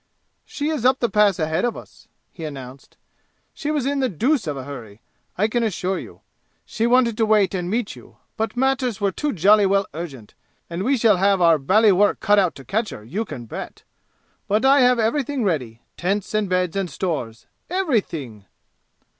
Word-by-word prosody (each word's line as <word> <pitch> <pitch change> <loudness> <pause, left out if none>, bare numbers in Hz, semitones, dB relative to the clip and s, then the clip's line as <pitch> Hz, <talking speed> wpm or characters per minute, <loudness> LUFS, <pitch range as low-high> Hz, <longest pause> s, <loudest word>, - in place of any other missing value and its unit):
"She 290 +1 -3
is 305 -7 -2
up 260 +1 +4
the 240 - 0
Pass 210 -3 +3
ahead 160 0 -1
of 240 -1 -1
us," - - -14 0.2
he 165 - -10
announced. 135 -3 -9 0.6
"She 295 - -5
was 295 -4 0
in 280 0 0
the 260 -2 +1
deuce 240 - 0
of 145 -2 -3
a 130 - -5
hurry, 115 -7 -9 0.4
I 210 +4 +2
can 240 +2 -1
assure 190 -4 -1
you. - - -12 0.4
She 225 +1 -1
wanted 240 -2 +3
to 225 - +2
wait 210 -3 +3
and 180 -2 -3
meet 225 +1 -2
you, - - -16 0.2
but 225 +2 -3
matters 260 -4 0
were 200 -1 +1
too 295 +10 -2
jolly 205 - +4
well 195 +1 +2
urgent, 140 -9 -8 0.4
and 170 +2 -3
we 265 +6 +1
shall 220 -4 +4
have 195 +1 +3
our 165 -3 +4
bally 205 +10 +4
work 205 +2 +3
cut 205 0 +4
out 185 -4 +1
to 135 - -12
catch 215 - -1
her, 105 - -9
you 195 - -3
can 120 - -8
bet! - - -8 0.6
But 215 +5 +1
I 275 +1 +6
have 250 -1 +5
everything 255 +3 0
ready 125 - -2
tents 195 +4 -2
and 215 -2 0
beds 180 -1 0
and 195 -2 -1
stores 140 -9 -4 0.2
everything!" 185 - -2
200 Hz, 195 wpm, -22 LUFS, 165-240 Hz, 0.6 s, I